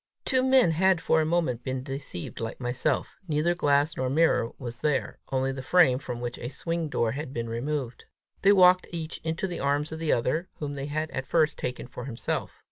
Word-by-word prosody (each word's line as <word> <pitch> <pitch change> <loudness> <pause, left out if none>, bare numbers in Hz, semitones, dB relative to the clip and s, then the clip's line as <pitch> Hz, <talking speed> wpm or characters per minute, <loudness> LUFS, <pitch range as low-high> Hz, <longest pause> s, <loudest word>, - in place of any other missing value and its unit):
Two 260 -2 +2
men 260 -7 +5
had 185 +2 +3
for 160 0 +2
a 155 - 0
moment 160 -8 0
been 130 -1 -3
deceived 135 -9 -6
like 115 0 -4
myself: 125 +3 -1
neither 155 +2 +2
glass 145 -2 +2
nor 130 0 -1
mirror 150 -5 +3
was 120 -2 -7
there 150 -3 0
only 135 0 +1
the 130 0 -5
frame 145 -3 +4
from 125 -4 -5
which 120 0 -5
a 120 - -4
swing 165 +3 -3
door 115 -5 +1
had 140 +2 -5
been 115 -2 -3
removed. 125 +2 -3 0.4
They 195 - +6
walked 185 -2 +6
each 165 -2 -5
into 160 +3 -2
the 180 -2 -4
arms 145 +2 0
of 160 - -5
the 160 -2 0
other, 160 +10 0
whom 145 -1 -4
they 140 0 -4
had 155 +2 -2
at 130 0 -4
first 155 -3 +3
each - - -9
taken 125 0 -3
for 125 -1 -8
himself. 120 -4 -4
145 Hz, 210 wpm, -27 LUFS, 130-165 Hz, 0.4 s, They